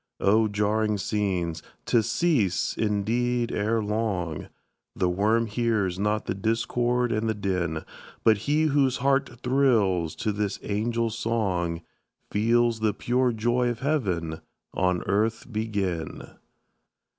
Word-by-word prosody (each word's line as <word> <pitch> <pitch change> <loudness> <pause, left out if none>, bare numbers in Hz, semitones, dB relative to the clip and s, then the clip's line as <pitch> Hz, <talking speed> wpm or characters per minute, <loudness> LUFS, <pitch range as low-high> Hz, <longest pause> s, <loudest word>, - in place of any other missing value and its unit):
Oh, 110 +3 +4
jarring 105 +1 0
scenes! 95 -5 -1 0.2
to 120 - +3
cease, 115 - +1
indeed, 115 +3 0
ere 110 +2 0
long; 105 -7 -2 0.5
The 90 - +1
worm 110 +5 +2
hears 105 -5 0
not 105 +1 0
the - - -1
discord 120 +4 0
and 110 0 0
the 110 - 0
din; 90 -6 -2 0.4
But 110 -2 +4
he 155 +2 +3
whose 140 -4 +2
heart 135 +1 +2
thrills 110 - +2
to 110 - -1
this 105 -1 -2
angel 115 +2 -1
song, 100 -7 -1 0.5
Feels 115 +2 +2
the 110 -1 +1
pure 125 +1 +1
joy 120 +2 +1
of 120 -1 -4
heaven 95 - -1 0.3
on 90 -1 +1
earth 110 +4 0
begin! 100 -6 -3
110 Hz, 120 wpm, -26 LUFS, 100-120 Hz, 0.5 s, Oh